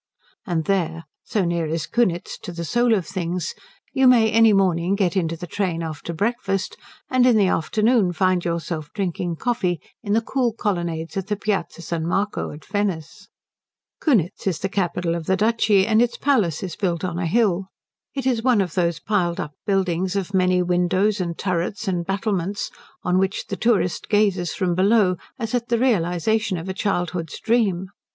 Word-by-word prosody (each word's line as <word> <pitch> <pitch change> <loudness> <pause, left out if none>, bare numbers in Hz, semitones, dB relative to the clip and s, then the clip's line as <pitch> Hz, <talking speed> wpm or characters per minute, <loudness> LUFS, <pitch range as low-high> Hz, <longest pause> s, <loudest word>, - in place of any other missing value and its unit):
And 165 -4 -1
there, 165 -4 0 0.2
so 205 -4 0
near 170 -1 0
is 160 0 -2
Kunitz 175 -2 0
to - - -7
the 170 -1 -5
soul 240 +6 +3
of 190 -5 -1
things, 180 -3 -3 0.4
you 265 -1 +4
may 230 -3 +5
any 225 -1 +6
morning 185 -2 +2
get 195 -2 +1
into 165 -3 0
the 175 - -6
train 175 -2 -2
after 160 +1 -5
breakfast 195 +1 -1 0.4
and 255 -1 +4
in 240 -3 +5
the 205 - +4
afternoon 210 +4 +2
find 185 0 +1
yourself 170 -2 -3
drinking 180 -3 -2
coffee 185 -4 -1 0.2
in 205 -2 -2
the 225 - +3
cool 245 -1 0
colonnades 170 -6 -2
of 195 -1 -3
the 210 - 0
Piazza 200 -4 -2
San 165 -1 -3
Marco 200 +4 -1
at 150 0 -10
Venice. 195 -7 -3 0.7
Kunitz 200 - +1
is 180 -4 +1
the 195 - -3
capital 180 -3 -1
of 170 -2 -4
the 190 - +2
duchy, 215 -2 +3
and 220 +1 +3
the 240 - +5
palace 215 - +1
is 180 -4 -5
built 175 -4 -1
on 175 -2 -2
a 175 - -1
hill. 195 -1 +2 0.5
It 270 -2 -3
is 245 -4 +1
one 245 -2 +3
of 180 -5 -1
those 170 -3 0
piled 175 -3 0
up 150 - -4
buildings 190 -1 0
of 200 0 -2
many 185 -1 +3
windows 185 +3 +1
and 170 -2 -3
turrets 185 +3 -2
and 175 -3 -1
battlements 195 -1 -1 0.3
on 180 +1 +2
which 190 +1 -1
the - - -2
tourist 220 -6 +1
gazes 200 -5 +2
from 185 -3 0
below 190 0 +3 0.2
as 225 0 -4
at 240 -1 0
the 235 - +2
realization 215 -2 +1
of 165 +3 -6
a 190 - -2
childhood's 175 -4 -2
dream. 200 -6 +1
190 Hz, 180 wpm, -22 LUFS, 170-215 Hz, 0.7 s, any